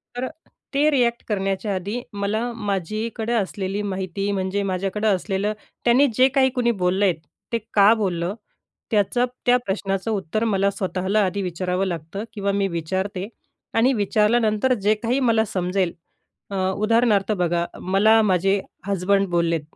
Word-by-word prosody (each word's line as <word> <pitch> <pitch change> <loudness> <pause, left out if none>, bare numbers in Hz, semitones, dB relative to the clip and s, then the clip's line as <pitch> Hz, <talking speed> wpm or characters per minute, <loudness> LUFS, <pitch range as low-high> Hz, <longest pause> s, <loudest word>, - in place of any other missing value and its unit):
तर 245 - -3
अ, - - -2 0.4
ते 295 +2 +4
रिएक्ट 240 -3 +2
करण्याच्या 195 0 -1
आधी 205 +6 -3
मला 215 +4 -1
माझीकडे 215 +3 -2
असलेली 200 -2 -1
माहिती, 195 0 -3
म्हणजे 195 +1 -1
माझ्याकडे 195 +3 -1
असलेलं 195 +1 0 0.3
त्यांनी 255 +4 +5
जे 260 +1 +6
काही 265 -1 +5
कोणी 240 -1 +2
बोललेत 185 0 +2 0.4
ते - - +3 0.2
का 205 +2 +7
बोललं, 185 -4 -1 0.6
त्याचं 220 +4 +2 0.2
त्या 250 0 +5
प्रश्नाचं 195 +1 -2
उत्तर 210 +1 -1
मला 200 -2 +2
स्वतःला 195 +1 0
आधी 195 +2 -2
विचारावं 180 +1 -1
लागतं 170 +4 -5
किंवा 200 -2 -1
मी 200 0 +1
विचारते. 190 +3 -3 0.5
आणि 250 +4 +3
विचारल्यानंतर 215 +3 +2
जे 210 +2 +4
काही 245 +4 +1
मला 225 -4 +3
समजेल, 185 -1 -1 0.6
अ 200 - -5 0.2
उदाहरणार्थ 215 -1 +2
बघा, 175 -3 0 0.2
मला 215 +4 +4
माझे 195 0 +2 0.3
हसबंड 195 +1 +1
बोललेत 170 -2 +1
200 Hz, 140 wpm, -23 LUFS, 190-220 Hz, 0.6 s, का